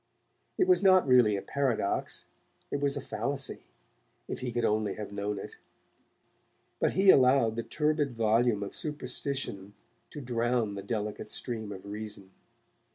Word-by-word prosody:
It 370 - +3
was 370 - +5
not, 185 -5 +5
really, 125 -5 +5
a 100 - -4
paradox, 130 -8 -1 0.5
it 145 - -1
was 140 0 +1
a - - -3
fallacy, 140 +1 -2 0.7
if - - -4
he 125 -1 -3
could 120 -1 0
only 105 -2 0
have 105 -1 -6
known 100 0 -3
it, - - -8 1.2
but - - +1
he 190 0 +7
allowed 125 -3 +4
the 115 - -1
turbid 150 -1 0
volume 115 -1 +2
of 100 - -7
superstition 135 -9 -4 0.3
to 150 - -8
drown 120 -4 0
the 100 - -5
delicate 105 +1 -4
stream 110 -3 -3
of 95 -1 -9
reason. 105 -2 -6
115 Hz, 150 wpm, -29 LUFS, 105-140 Hz, 1.2 s, he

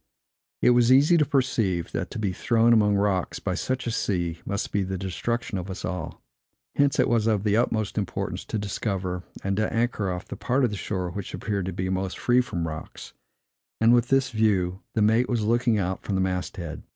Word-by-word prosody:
It - - +6
was 120 0 +4
easy 145 +6 +6
to 150 - +4
perceive, 115 - 0
that - - -3
to - - -7
be 100 -4 -1
thrown 115 +4 +3
among 105 -2 +4
rocks, 100 -2 0
by 95 - -2
such 130 +7 -2
a 120 - -1
sea, 85 -7 -1
must 100 +1 -2
be 100 - +1
the 95 0 -3
destruction 95 +3 -3
of 90 +2 -7
us 95 - -5
all. 90 -1 -5 0.5
Hence 140 -1 +3
it - - +3
was 115 -2 +2
of 105 -3 +1
the 105 -1 +2
utmost 110 -2 0
importance 100 - -3
to - - -3
discover, 95 -3 -2 0.2
and 95 0 0
to 110 - 0
anchor 115 -4 0
off, 90 0 -5
the - - -6
part 125 +7 0
of 120 - +2
the - - -3
shore 95 -3 -3
which 100 +1 -5
appeared 100 -4 -2
to - - -2
be 90 +1 -3
most 95 0 -2
free 125 +1 +3
from 85 -9 -3
rocks; 80 -1 -8 0.7
and 115 +1 +5
with 120 0 +3
this 135 -1 +2
view 100 -4 +1
the 110 - +3
mate 110 +4 +3
was 120 -3 0
looking 120 0 +2
out 95 -1 -2
from 100 - -3
the 95 - +1
mast 90 +1 -2
head. 85 -4 -6
105 Hz, 215 wpm, -25 LUFS, 95-120 Hz, 0.7 s, It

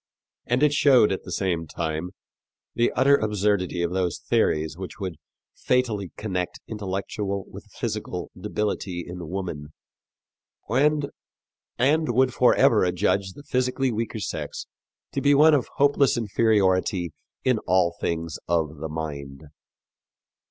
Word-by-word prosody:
And 125 +4 +2
it 150 -1 +4
showed, 130 -8 +5
at 95 - -3
the 90 - -8
same 85 -3 -1
time, 80 +2 -3 0.6
the 120 - +2
utter 135 +3 +5
absurdity 100 -5 0
of 85 - -1
those 90 -3 0
theories 75 0 0
which 95 +3 -8
would 95 -5 -4 0.4
fatally 110 -8 0
connect 90 -4 -3
intellectual 100 -1 -3
with - - -11
physical - - -4
debility 95 -4 -3
in 90 -2 -7
woman, 90 -6 -4 1.0
and 145 +3 +2 1.0
would 130 +1 +3
forever 120 -3 +4
adjudge 95 +1 0
the 145 - -12
physically 130 0 0
weaker 115 0 -3
sex - - -4 0.5
to - - -2
be 145 0 +4
of 150 -2 +5
hopeless 140 -2 +3
inferiority 95 -5 +2 0.3
in 125 -4 +2
all 90 -2 +3
things 85 -2 -2
of 80 -2 0
the 80 +2 -5
mind. 75 -2 -6
95 Hz, 125 wpm, -25 LUFS, 85-120 Hz, 1.0 s, showed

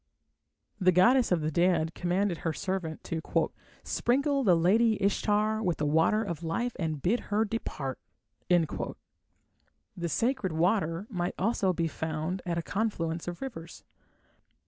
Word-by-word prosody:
The 185 -2 +5
goddess 240 +8 +4
of 175 -3 +3
the 155 +1 -1
dead 170 -1 +2
commanded 180 0 0
her 165 - -2
servant 185 -3 -3
to 165 -1 -3 0.6
"sprinkle 275 +2 +1
the 185 -6 +5
lady 215 +7 +3
Ishtar 210 +2 +1
with 175 -5 0
the 150 - -1
water 160 +9 +3
of 170 -6 -5
life 205 +10 -1
and 160 -4 -2
bid 210 - +1
her 210 +2 +2
depart". 150 - -4 0.5
The 175 -2 +4 1.4
sacred 230 - 0
water 170 +1 +1
might 175 -3 -2
also 195 -1 +1
be 170 -2 0
found 160 +4 -3
at 170 -1 -1
a 170 - -1
confluence 175 -5 -2
of 175 +7 -5
rivers. 190 -12 -8
180 Hz, 140 wpm, -29 LUFS, 165-215 Hz, 1.4 s, The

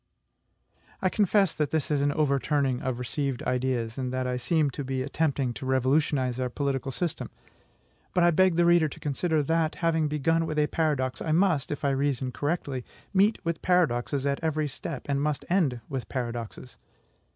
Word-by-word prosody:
I 185 - +1
confess 200 -3 +2
that 150 -2 -1
this 155 -2 -1
is 145 -2 +2
an 145 0 +2
overturning 140 -3 +1
of 130 -2 -2
received 130 +1 -2
ideas, 125 -2 -1
and 130 -1 -2
that 130 0 -1
I 125 0 -1
seem 145 +4 +1
to 140 - -5
be 130 0 -2
attempting 140 -3 0
to 130 - -7
revolutionize 130 -1 +1
our 125 -1 -1
political 135 0 -2
system; 170 +4 -3 0.9
but 180 - +4
I 175 - +5
beg 185 +1 +4
the 175 0 +3
reader 170 -2 +5
to - - -11
consider 155 +2 0
that, 160 +1 +1
having 160 -2 +1
begun 165 +3 +1
with 155 -1 -3
a 150 - +4
paradox, 145 -5 -1
I 155 - 0
must, 170 -5 +2
if 145 0 -3
I 140 - +3
reason 135 -2 0
correctly, 140 -1 -2 0.3
meet 200 +3 +4
with 165 -1 -2
paradoxes 145 -6 +1
at 140 +2 -1
every 155 -1 0
step, 140 +1 -6
and 140 -1 0
must 150 -1 -1
end 145 -11 +2
with 135 -3 -5
paradoxes. 120 -1 -5
145 Hz, 180 wpm, -27 LUFS, 130-160 Hz, 0.9 s, I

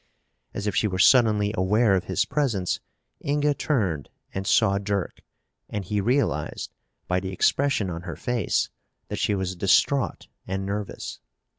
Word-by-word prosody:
As 100 - -3
if 105 - -1
she 110 - +3
were 95 -2 -2
suddenly 105 -1 +5
aware 105 +3 +3
of 95 -1 +1
his - - +1
presence, 115 -12 0 0.4
Inga 145 +1 +2
turned 100 - -1 0.2
and 95 0 -3
saw 100 -3 +4
Dirk 100 -2 -3 0.5
and 105 -2 -4
he 105 +2 0
realized, 130 +7 0 0.3
by 90 0 +1
the 95 0 -5
expression 110 0 +1
on 85 0 -5
her 85 -3 -6
face, 120 -6 0 0.4
that - - -3
she 105 - +1
was 95 -1 -2
distraught 100 +9 +2 0.2
and 95 +1 -2
nervous. 100 +1 -4
100 Hz, 150 wpm, -25 LUFS, 95-120 Hz, 0.5 s, suddenly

